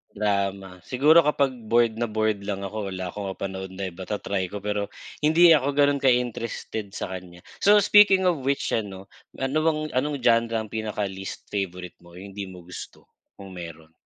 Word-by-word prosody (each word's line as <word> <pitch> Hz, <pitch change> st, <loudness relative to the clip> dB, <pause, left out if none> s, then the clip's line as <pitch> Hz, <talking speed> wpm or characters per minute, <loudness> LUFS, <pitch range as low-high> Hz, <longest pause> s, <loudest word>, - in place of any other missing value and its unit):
Drama, 100 Hz, -2 st, -1 dB
siguro 145 Hz, -, +4 dB
kapag 140 Hz, -2 st, +2 dB, 0.2 s
bored 115 Hz, -1 st, +2 dB
na 120 Hz, -, 0 dB
bored 110 Hz, -1 st, 0 dB
lang 100 Hz, -1 st, -3 dB
ako 105 Hz, +1 st, -4 dB
wala 95 Hz, -2 st, -5 dB
ako 100 Hz, -1 st, -5 dB
mapanood 95 Hz, -1 st, -5 dB
na 95 Hz, -1 st, -4 dB
iba, 90 Hz, +2 st, -9 dB
ta-try 100 Hz, -2 st, -2 dB
ko 100 Hz, +2 st, -8 dB
pero 105 Hz, -1 st, -1 dB, 0.3 s
hindi 165 Hz, +3 st, +6 dB
ako 140 Hz, -2 st, +3 dB
ganun 145 Hz, 0 st, +3 dB
ka 135 Hz, -, +1 dB
interested 115 Hz, -3 st, -1 dB
sa -, -, -4 dB
kanya. 90 Hz, -1 st, -9 dB, 0.2 s
So, 205 Hz, +1 st, +6 dB
speaking 205 Hz, -2 st, +6 dB
of 180 Hz, -4 st, +2 dB
which 140 Hz, 0 st, 0 dB
ano, 95 Hz, -3 st, -4 dB, 0.2 s
ano 135 Hz, +3 st, -1 dB
bang 155 Hz, -1 st, +1 dB
anong 145 Hz, +3 st, 0 dB
genre 115 Hz, -1 st, +3 dB
ang 110 Hz, -1 st, -3 dB
pinaka 110 Hz, -2 st, -3 dB
least 95 Hz, -1 st, -7 dB
favorite 90 Hz, -3 st, -4 dB
mo 85 Hz, 0 st, -17 dB
,hindi 100 Hz, +1 st, -7 dB
mo 90 Hz, -1 st, -11 dB
gusto 85 Hz, 0 st, -11 dB, 0.2 s
kung 95 Hz, -1 st, -11 dB
meron? 80 Hz, -2 st, -10 dB
105 Hz, 180 wpm, -25 LUFS, 95-130 Hz, 0.3 s, hindi